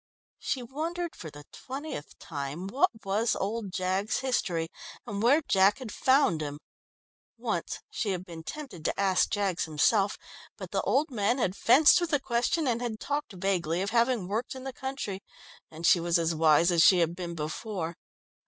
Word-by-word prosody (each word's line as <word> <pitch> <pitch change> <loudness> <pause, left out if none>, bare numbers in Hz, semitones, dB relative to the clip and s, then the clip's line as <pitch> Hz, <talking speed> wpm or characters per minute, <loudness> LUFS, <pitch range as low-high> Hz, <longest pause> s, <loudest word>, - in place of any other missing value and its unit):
She 260 -3 -2
wondered 330 +7 -4
for 160 - -8
the 145 0 -12
twentieth 270 - -7
time 145 +3 -5
what 270 - +2 0.2
was 210 +4 +1
old 205 0 -3
Jaggs's 190 +4 -1
history, 180 -11 0 0.4
and 200 0 -4
where 280 +7 +4
Jack 195 +4 +4
had 255 -5 -7
found 260 - +3
him. 145 -1 -4 0.8
Once - - -3
she 235 - -2
had 185 -1 -2
been 165 -3 -9
tempted 185 - -8
to - - -1
ask 190 -2 +3
Jaggs 200 -5 0
himself, 195 +6 +2 0.4
but - - -8
the - - 0
old 295 +2 +1
man 225 +1 +1
had 190 -7 0
fenced 280 +11 +6
with 345 - -1
the 290 -3 +2
question, 265 +5 0
and 240 -1 0
had 230 -3 -3
talked 290 -6 -3
vaguely 180 -2 0
of 200 - -3
having 235 -4 +2
worked 225 +7 -3
in 260 - -8
the 265 0 -5
country, 265 -8 -5 0.5
and 160 +1 -7
she 175 - +6
was 170 0 +2
as 165 0 +1
wise 160 +2 +4
as 170 -1 +4
she 185 - +7
had 170 -1 +1
been 175 -1 -5
before. 165 +2 -4
200 Hz, 180 wpm, -28 LUFS, 170-255 Hz, 0.8 s, she